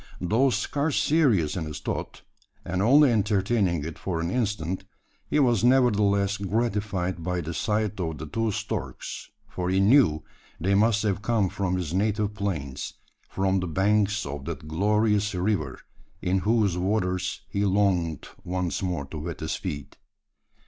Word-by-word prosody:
Though 115 +9 +2
scarce 145 +4 0
serious 125 - +2
in 85 -4 -2
his 75 -1 -6
thought - - -5 0.4
and 90 +2 -1
only 135 +5 +6
entertaining 100 -5 +1
it 80 - -7
for 90 -4 -2
an 85 +1 -2
instant 100 -7 -1 0.5
he - - +1
was 120 -7 +3
nevertheless 105 -6 +3
gratified 100 -4 -1
by 90 +1 -1
the 85 +1 -5
sight 105 +1 -1
of 80 -4 -2
the 75 - -6
two 115 +8 -1
storks, - - -5 0.2
for 90 -1 -3
he 95 +1 +2
knew 95 - +4 0.4
they 95 +4 +1
must 110 +2 +3
have 100 -1 0
come 105 -3 +1
from 95 -1 -1
his 85 -3 -3
native 105 +1 0
plains 85 -10 -4 0.3
from 95 0 +1
the 90 - -3
banks 105 +4 +1
of 70 -1 -6
that 75 - -6
glorious 105 +4 +1
river 90 -8 -1 0.4
in 95 +1 +1
whose 105 -3 +1
waters 90 -1 -1
he 100 - -1
longed 95 -6 +1 0.2
once 90 -1 -2
more 90 -6 -2
to 75 +3 -7
wet 85 +2 -5
his 80 - -2
feet. 70 -1 -6
95 Hz, 155 wpm, -26 LUFS, 90-105 Hz, 0.5 s, only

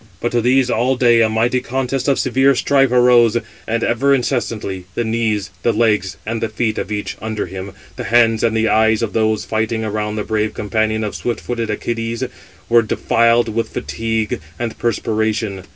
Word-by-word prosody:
But 120 - -2
to 120 - +1
these 125 +1 +3
all 125 +4 +1
day 120 -2 +4
a 110 - +3
mighty 115 +3 +1
contest 130 +1 -2
of 140 - +3
severe 130 +2 +3
strife 135 0 +2
arose, 120 -2 +5 0.3
and 115 +1 -1
ever 135 +4 +2
incessantly 115 -7 -2
the 120 - 0
knees, 110 -3 -1
the 120 - +2
legs, 105 -4 +1
and 115 +1 -3
the 115 - -1
feet 110 -1 -1
of - - -5
each 105 -1 -4
under 110 -1 -3
him, 95 +2 -7 0.2
the 125 - -5
hands 115 -1 +3
and 115 -1 +2
the 110 0 +2
eyes 110 0 +3
of 110 - -3
those 110 -1 +1
fighting 110 0 -1
around 105 0 -2
the 105 - -2
brave 110 0 -1
companion 110 +1 -1
of 105 - -3
swift 120 -1 -3
footed 115 -2 -3
Æacides, 115 +3 -3 0.4
were 120 0 +5
defiled 115 +1 +2
with 115 +1 -1
fatigue 110 -5 -3 0.2
and 120 -2 -3
perspiration. 110 -3 -1
115 Hz, 185 wpm, -18 LUFS, 110-120 Hz, 0.4 s, arose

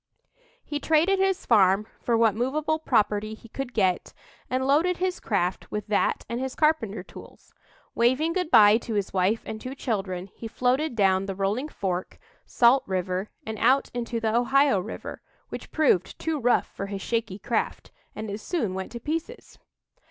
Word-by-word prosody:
He 295 - -3
traded 325 +6 +3
his 385 -1 +1
farm 200 -2 +4 0.2
for 235 -2 +1
what 225 -2 +4
movable 295 +7 -1
property 215 -6 +1
he 230 - -16
could 260 +2 -5
get, 190 -6 0 0.4
and 260 +1 0
loaded 325 +6 +3
his 365 0 -2
raft 185 -4 0
with 210 -1 -4
that 210 - 0
and 235 - -3
his 260 0 -4
carpenter 225 - +1
tools. - - -14 0.4
Waving 260 +8 +2
good 360 -3 -1
bye 210 -4 +7
to 230 -2 -5
his 200 -2 -2
wife 195 +4 +1
and 220 0 -6
two 255 +2 -6
children, 195 -7 -3
he 230 - -7
floated 250 +5 0
down 195 -2 +2
the 195 - -3
Rolling 205 +10 -1
Fork, 185 -8 -3 0.3
Salt 245 +3 +4
River, 185 +1 -2 0.2
and 220 -1 -5
out 260 +4 +3
into 235 -1 -3
the 220 0 0
Ohio 265 -1 +3
River, 180 - -7 0.3
which - - -7
proved 270 - +2
too 320 -2 -2
rough 245 -1 +3
for 195 - -4
his 195 -1 -5
shaky 225 -5 -2
craft, 220 +2 -2 0.2
and 215 +1 -5
it 205 - -4
soon 225 - -2
went 190 0 -5
to 235 - -5
pieces. 330 - -5
230 Hz, 175 wpm, -26 LUFS, 200-275 Hz, 0.4 s, bye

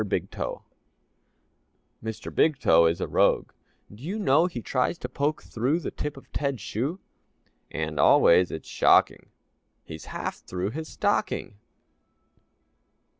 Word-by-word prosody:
BIG 100 - -2
TOE - - -5 1.4
Mr. 110 -1 -6
Big 155 -3 +3
Toe 85 -9 +5
Is 85 +1 -1
a - - -1
rogue, - - +2 0.4
do 105 - -14
you 185 +9 -4
know 165 -4 +3
He 125 -10 -6
tries 130 +6 0
to 125 - -5
poke 145 +4 -2
through 130 +8 -1
The 170 - -5
tip 150 -1 -5
of 135 - -15
Ted's 140 -4 -2
shoe? 135 - -3 0.7
And 80 -1 -4
always, 90 +4 +5
it's 80 - -7
shocking. - - +3 0.6
He's - - -9
half - - -5
through 90 +3 -4
his 155 +5 -6
stocking! 100 - -1
125 Hz, 135 wpm, -26 LUFS, 95-150 Hz, 1.4 s, Toe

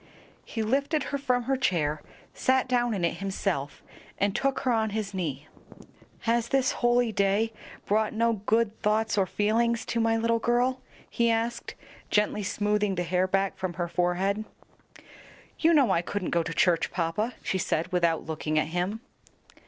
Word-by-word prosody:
He 225 - -3
lifted 280 +6 +1
her 280 - 0
from 250 -3 +1
her 270 +3 0
chair, 155 - 0 0.3
sat 260 0 +2
down 240 -2 +1
in 180 -3 0
it - - -1
himself, 190 -7 -3 0.3
and 200 0 0
took 275 0 0
her 255 - +1
on 220 -2 +1
his 210 -1 -3
knee. 150 -6 -4 0.7
"Has 235 0 +1
this 265 +1 +2
holy 240 -1 +2
day 205 +2 +1 0.3
brought 215 +1 +1
no 230 +1 +2
good 225 -1 +1
thoughts 220 +1 +1
or 195 -2 +2
feelings 230 +4 +1
to 235 - -2
my 225 0 +2
little 230 0 +1
girl?" 245 +3 +1 0.3
he 235 0 +1
asked, 230 +1 -1 0.3
gently 210 0 +1
smoothing 205 0 0
the 180 - -1
hair 180 +2 +1
back 195 +1 0
from 185 -2 -2
her 175 -1 -2
forehead. 180 +4 0 1.2
"You 330 - +4
know 285 -7 +4
I 170 - +2
couldn't 185 +1 -3
go 170 - +2
to 165 - -4
church, 170 0 +2
papa," 185 +8 -2
she 190 - -1
said, 170 +1 -1
without 170 -3 +1
looking 155 -1 -2
at 155 0 +1
him. 180 +6 -2
210 Hz, 170 wpm, -27 LUFS, 180-235 Hz, 1.2 s, You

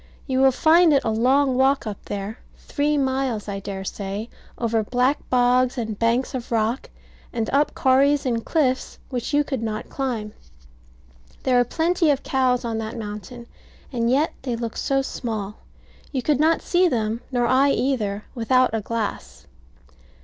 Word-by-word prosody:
You 260 -2 0
will 265 0 +6
find 320 +4 +5
it 275 - +3
a - - 0
long 260 +4 +3
walk 270 +1 +2
up 210 -3 -6
there; 205 +3 -5 0.2
three 295 +1 -1
miles, 265 -5 -1
I 200 -1 -3
dare 195 -1 -6
say, 200 +3 -5 0.3
over 230 -1 0
black 250 +6 +1
bogs 250 +1 +3
and 220 -3 -3
banks 235 +3 +1
of 250 -2 -5
rock, 230 +3 0 0.4
and 225 -3 -2
up 285 +2 +2
corries 275 +2 +3
and 230 -3 0
cliffs 260 -6 0
which 245 -1 -3
you 290 0 +3
could 270 -4 -3
not 215 -1 -4
climb. 235 -6 -3 1.1
There 250 -1 +3
are - - +5
plenty 330 +5 +1
of 280 -2 +1
cows 255 -2 +1
on 225 -1 -2
that 220 +2 -5
mountain: 215 +2 -7 0.5
and 235 -1 0
yet 285 +5 +2
they 250 -3 -2
look 230 -1 -4
so 270 0 0
small, 215 -6 -4 0.5
you 260 -4 -2
could 295 -3 +2
not 320 +2 +3
see 360 +1 +3
them, 225 -5 -1
nor 245 -2 +1
I 265 +4 +4
either, 215 -7 -1
without 255 +1 +2
a 225 - 0
glass. 195 - -4
245 Hz, 165 wpm, -23 LUFS, 220-270 Hz, 1.1 s, will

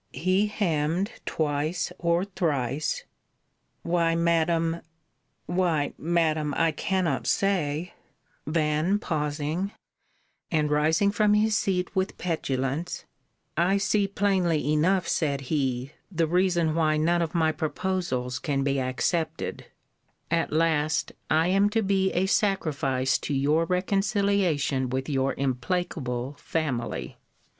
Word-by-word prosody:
He 185 +8 +2
hemm'd 180 -1 0 0.2
twice 155 +2 -1
or 170 +2 +1
thrice 155 -6 -1 0.8
Why, 170 -1 +1
Madam 165 0 +1 0.6
why, 175 -5 0
Madam, 160 -3 0
I 165 -1 +3
cannot 170 -3 -1
say 175 -4 0 0.5
then 155 +4 +1
pausing 155 +1 -2 0.8
and 150 -3 +1
rising 160 +7 +3
from 210 0 +3
his 215 +1 +3
seat 185 -2 0
with 190 0 -1
petulance; 140 -2 -2 0.5
I 180 +5 +3
see 200 0 +1
plainly 185 -7 +1
enough, 180 +5 +2
said 140 -4 0
he, 130 -2 -1 0.2
the 165 -2 +1
reason 175 -1 +2
why 155 -1 +2
none 170 +3 +2
of 165 0 -2
my 160 -2 +3
proposals 155 -5 -2
can 135 -2 -1
be 140 0 +1
accepted: 155 +5 -2 0.6
at 165 -1 +1
last 155 -1 +1 0.2
I 160 +2 +3
am 195 +2 +4
to 225 +1 +1
be 195 -1 +2
a 180 +2 +2
sacrifice 145 -10 +1
to 145 - -3
your 150 +5 +2
reconciliation 185 - +1
with 130 +1 -2
your 135 -2 0
implacable 135 -1 -2
family. 135 -8 -3
165 Hz, 115 wpm, -26 LUFS, 145-185 Hz, 0.8 s, am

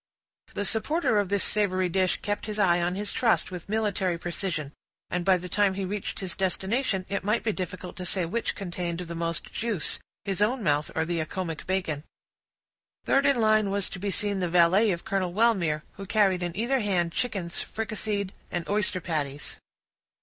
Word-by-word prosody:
The 205 - -1
supporter 225 - +2
of 200 -3 0
this 200 -1 +1
savory 185 -3 +2
dish 185 +1 +1
kept 205 +1 -2
his 210 -1 -3
eye 175 -4 +4
on 175 +1 0
his 205 +1 -2
trust 230 -5 +2
with 180 0 -7
military 200 -5 0
precision; 170 -4 -3 0.4
and 180 0 0
by 185 0 +5
the 180 +1 -7
time 195 +1 +2
he 195 0 -2
reached 200 +1 -3
his 185 -2 -4
destination, 190 +2 0
it 200 -1 -2
might 210 +4 +1
be 220 - +1
difficult 185 -1 -5
to 180 - -4
say 185 -1 +1
which 230 +8 -1
contained 175 -2 -3
the 170 -1 -6
most 170 0 -3
juice, 225 -7 -1 0.3
his 195 -1 -1
own 235 +3 +2
mouth 150 -3 +2
or 160 - +1
the 170 0 -1
Accomac 165 +1 -3
bacon. 180 -6 -1 1.0
Third 275 +1 +4
in 280 - +5
the 240 - 0
line 215 -1 +4
was 200 -1 0
to 190 - -5
be 200 +2 -2
seen 200 +1 0
the 180 -2 0
valet 180 +5 +5
of 175 -3 -2
Colonel 195 -5 0
Wellmere, 185 -9 +3
who 195 0 -7
carried 195 -4 +3
in 175 0 -3
either 250 +5 +2
hand 185 -6 +1
chickens 185 -6 -2
fricasseed 215 -3 -2 0.2
and 175 -1 -3
oyster 205 -3 +1
patties. 150 -4 -3
190 Hz, 190 wpm, -27 LUFS, 175-210 Hz, 1.0 s, by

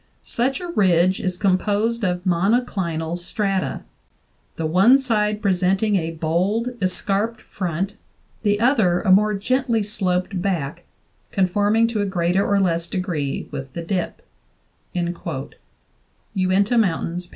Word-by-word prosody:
Such 255 +3 0
a 355 - -6
ridge 185 - +3
is 185 -1 -2
composed 205 +4 +1
of 180 -2 0
monoclinal 175 -4 0
strata, 195 +1 -2 0.7
the 160 - -3
one 190 +11 +5
side 215 -5 0
presenting 195 +2 +2
a 165 -4 0
bold 175 +9 0
escarped 200 +4 0
front, 190 +3 -3 0.4
the 205 -1 +1
other 220 -8 +3
a 190 - +2
more 210 +2 +4
gently 235 +2 0
sloped 185 -2 -1
back 175 -4 -2 0.5
conforming 205 +4 +2
to 220 -3 -1
a 205 - 0
greater 180 +1 +1
or 200 0 +2
less 170 -3 +1
degree 170 -8 -3
with 135 -2 -6
the 170 - -5
dip" 180 +1 -3 0.7
(Uinta 185 - -3
Mountains, 180 -3 -1
16). - - -23
190 Hz, 125 wpm, -22 LUFS, 175-210 Hz, 0.7 s, one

